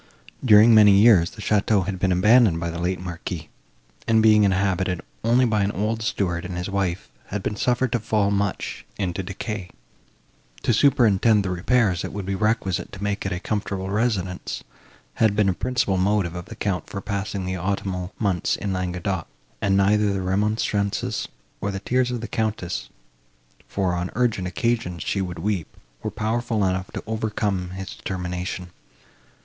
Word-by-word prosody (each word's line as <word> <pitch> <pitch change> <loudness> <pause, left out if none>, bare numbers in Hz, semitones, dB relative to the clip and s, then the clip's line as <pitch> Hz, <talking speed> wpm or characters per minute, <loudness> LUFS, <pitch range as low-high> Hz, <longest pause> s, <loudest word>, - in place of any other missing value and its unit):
During 110 -1 +7
many 105 -2 +8
years, 100 -4 +6
the 110 - -10
château 105 -2 +2
had 95 -2 -3
been 95 0 +1
abandoned 105 0 +5
by 85 0 -2
the 85 - -5
late 90 +2 -1
Marquis, 85 -3 -6 0.6
and, 115 -1 +4
being 105 -1 +6
inhabited 95 -2 +1 0.2
only 120 +3 +4
by 110 -3 +1
an 100 +1 +1
old 110 +4 -1
steward 90 -5 -1
and 90 0 -5
his 90 +2 -4
wife, 95 -3 -1 0.2
had 100 -1 -4
been 105 - -2
suffered 125 +2 +1
to 120 - +1
fall 105 -2 +1
much 100 -1 -2
into 95 -2 -2
decay. 95 0 -5 0.9
To - - +2
superintend 110 -5 +4
the 95 - -1
repairs, 95 0 +2
that - - -5
would 100 -2 -4
be 100 - -2
requisite 105 -2 0
to 100 0 -7
make 100 -1 -1
it - - -4
a 90 - -2
comfortable 95 -1 -3
residence, 100 -5 -1 0.6
had 110 -2 +4
been 105 -1 +3
a - - +2
principal 125 -3 0
motive 95 -2 +1
with 90 -1 -6
the - - -9
Count 95 -5 -2
for 100 - -4
passing 100 -1 -3
the 95 0 -3
autumnal 95 0 -2
months 95 -6 0
in 100 -1 -3
Languedoc; 90 -1 -2 0.3
and 95 -1 +2
neither 105 +1 +3
the 95 -1 -2
remonstrances, 100 +1 0 0.3
nor 100 - -1
the 95 -1 -3
tears 125 +4 +1
of 125 -2 -3
the 120 - -4
Countess, 110 -5 -2 0.8
for, 95 -3 -1
on 90 0 -2
urgent 115 -7 +1
occasions, 90 -5 -1
she 100 - -1
could 90 -2 -5
weep, 100 -6 -1 0.3
were - - -2
powerful 110 -1 -1
enough 95 0 -1
to - - -6
overcome 105 -4 -2
his 95 -1 -6
determination. 90 -1 -4
100 Hz, 170 wpm, -23 LUFS, 90-110 Hz, 0.9 s, many